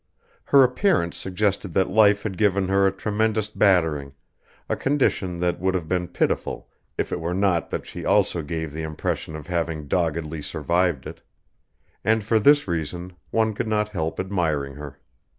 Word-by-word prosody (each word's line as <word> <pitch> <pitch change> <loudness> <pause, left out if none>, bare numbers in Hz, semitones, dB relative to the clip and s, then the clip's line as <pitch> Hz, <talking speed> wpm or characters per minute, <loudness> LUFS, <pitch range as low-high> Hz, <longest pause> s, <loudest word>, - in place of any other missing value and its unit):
Her 140 -1 +6
appearance 125 - +1
suggested 95 -1 -1
that 95 -1 +2
life 100 -1 +5
had 100 -3 -3
given 100 -2 +1
her 95 0 +4
a - - +2
tremendous 110 +2 -1
battering, 80 -10 +2 0.5
a - - 0
condition 130 -10 0
that 90 0 0
would 95 +1 0
have 85 -4 -2
been 90 0 -1
pitiful - - -2 0.3
if - - -2
it - - -2
were 85 +1 -2
not 95 -3 +1
that - - -4
she - - -8
also 85 - +2
gave 80 0 -4
the 80 - -4
impression 80 0 -3
of 75 -2 -8
having 80 -3 -2
doggedly 80 -1 -1
survived 85 0 0
it; - - -9 0.8
and 110 0 +2
for 110 +2 +2
this 145 +4 +5
reason 85 +2 -4 0.2
one 110 -1 +1
could 105 - -3
not 105 -1 0
help 80 -6 -3
admiring 80 -8 -1
her. 70 0 -9
90 Hz, 170 wpm, -24 LUFS, 80-105 Hz, 0.8 s, Her